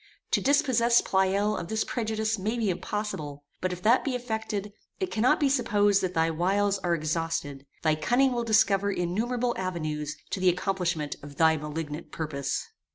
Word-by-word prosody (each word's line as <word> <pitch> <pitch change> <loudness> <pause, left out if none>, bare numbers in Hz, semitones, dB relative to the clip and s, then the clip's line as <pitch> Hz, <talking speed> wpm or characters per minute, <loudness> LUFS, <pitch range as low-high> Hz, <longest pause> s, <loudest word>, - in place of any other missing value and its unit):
To - - +3
dispossess 255 -5 +4
Pleyel 195 +2 +1
of 170 - -4
this 220 +3 0
prejudice 220 -2 -1
may 215 +5 -1
be 220 -5 +1
impossible; 175 -6 -4 0.2
but 185 - 0
if 180 0 -6
that 235 +4 +4
be 270 -3 -1
effected, 220 -4 -3 0.3
it 375 -2 -2
cannot 225 +3 +3
be 290 - +3
supposed 205 -6 +3
that 185 -1 -2
thy 165 0 +2
wiles 195 +4 +1
are 175 -2 +1
exhausted; 155 -3 -3 0.2
thy 155 -1 +3
cunning 245 - +2
will 240 -1 -1
discover 200 -3 +3
innumerable 235 +8 -1
avenues 155 -5 -3
to - - -2
the 185 0 +4
accomplishment 175 -5 -1
of 145 0 -10
thy 160 +1 +4
malignant 150 +1 -5
purpose. 150 -4 -3
190 Hz, 165 wpm, -27 LUFS, 165-220 Hz, 0.3 s, dispossess